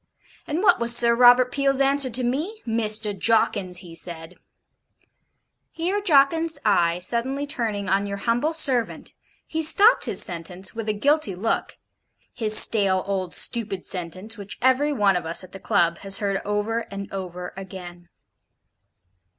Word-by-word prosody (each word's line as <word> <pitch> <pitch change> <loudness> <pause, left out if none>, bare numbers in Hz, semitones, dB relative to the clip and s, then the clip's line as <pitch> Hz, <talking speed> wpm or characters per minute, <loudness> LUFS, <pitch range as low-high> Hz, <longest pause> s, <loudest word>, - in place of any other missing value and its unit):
And 320 +6 -3
what 360 -8 +4
was 235 0 +2
Sir 235 -1 +4
Robert 245 +1 +5
Peel's 275 0 0
answer 275 -1 +2
to 250 +2 -2
me? 310 - -3
"Mr. 215 -2 -1
Jawkins," 195 -3 0
he 170 - -12
said 165 0 -7 0.7
' - - -47
Here 375 +5 -1
Jawkins's 320 -1 +2
eye 170 -5 +2
suddenly 245 +9 -1
turning 220 -8 -3
on 195 +2 0
your 200 0 -5
humble 240 +9 0
servant, 265 -7 0 0.3
he 320 - -4
stopped 400 +9 +5
his - - 0
sentence, 180 0 -3
with 225 -1 -5
a - - +1
guilty 275 - 0
look 215 +5 -3 0.6
his 215 -2 +1
stale 195 -5 +3
old 190 -3 -3
stupid 215 -6 +2
sentence, 185 +5 -6
which 200 0 -9
every 260 +4 +2
one 205 -8 +2
of 175 -2 -3
us 165 +3 0
at 185 - -13
the 190 - -10
Club 175 -5 0
has 195 0 -1
heard 200 -2 -2
over 210 +3 -2
and 195 0 -8
over 180 -2 -7
again. 180 -2 -10
215 Hz, 155 wpm, -23 LUFS, 190-260 Hz, 0.7 s, Robert